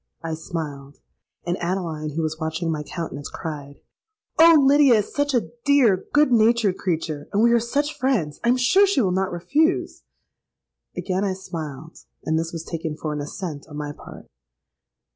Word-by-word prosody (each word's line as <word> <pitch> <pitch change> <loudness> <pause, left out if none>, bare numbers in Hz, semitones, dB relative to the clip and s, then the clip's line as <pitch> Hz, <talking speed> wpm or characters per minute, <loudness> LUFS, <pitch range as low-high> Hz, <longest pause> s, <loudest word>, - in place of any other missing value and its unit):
'—I 165 -1 -3
smiled; 150 -4 -6 0.5
and 175 +1 -2
Adeline, 170 -4 -3
who 165 - -1
was 155 0 -3
watching 160 +1 -2
my 155 -2 -2
countenance, 150 -3 -6
cried, 145 -3 -7 0.6
'Oh! 330 0 +8
Lydia 280 -2 +6
is 210 -1 -1
such 285 -1 0
a 205 -10 0
dear 250 -10 +3
good 295 -2 +4
natured 225 -4 +3
creature, 160 -4 -3
and 205 +2 +2
we 235 - +5
are 235 - +5
such 285 +6 -1
friends, 215 - -1
I - - 0
am 250 - +4
sure 375 +11 +4
she 390 -7 +1
will 190 -5 +1
not 190 +1 0
refuse.'—Again 190 - -3
I 195 -2 0
smiled; 160 -5 -8 0.3
and 160 0 +1
this 165 0 -3
was 165 -1 -6
taken 160 -2 -5
for 155 -1 -4
an 150 - -3
assent 150 0 -6
on 150 - -8
my 145 -1 -4
part. - - -12
175 Hz, 170 wpm, -23 LUFS, 155-235 Hz, 0.6 s, Oh